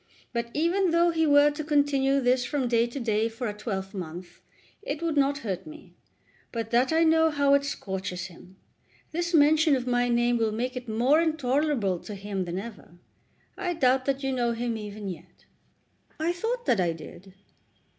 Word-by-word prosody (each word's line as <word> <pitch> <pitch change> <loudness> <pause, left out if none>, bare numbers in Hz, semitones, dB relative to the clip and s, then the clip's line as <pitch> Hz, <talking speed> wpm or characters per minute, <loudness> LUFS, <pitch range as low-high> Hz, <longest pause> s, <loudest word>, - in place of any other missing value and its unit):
But 235 0 -2
even 350 +5 +2
though 340 +1 +3
he 320 -1 +1
were 290 0 +6
to 300 +1 -5
continue 285 -2 +2
this 250 -1 +2
from 270 -1 -1
day 235 0 +2
to 240 +4 -6
day 225 -2 0
for 230 +2 -5
a 210 - -3
twelvemonth 190 -5 -6 0.4
it 290 -7 -4
would 330 -2 0
not 280 0 +2
hurt 190 - -4
me, 310 0 -12 0.6
but 230 -1 -4
that 245 +4 +3
I 325 +1 +4
know 320 0 +4
how 285 -2 +2
it 280 0 +4
scorches 190 -8 -4
him. 185 0 -13 0.6
This 340 +1 -2
mention 305 0 +5
of 250 -2 -3
my 245 -1 +1
name 240 0 +2
will 225 -1 +1
make 250 +4 -3
it 250 -2 -6
more 250 +8 +3
intolerable 280 - 0
to 210 - -8
him 195 -1 -4
than 175 +1 -4
ever. 200 -4 -9 0.6
I 350 -1 -2
doubt 260 -3 +2
that 275 0 -1
you 270 - 0
know 240 -2 0
him 235 0 -2
even 210 -1 -7
yet." 180 -3 -10 0.7
"I 330 +2 0
thought 475 +7 -3
that 230 - +2
I 175 -2 +1
did." 180 +4 -12
250 Hz, 185 wpm, -27 LUFS, 215-295 Hz, 0.7 s, were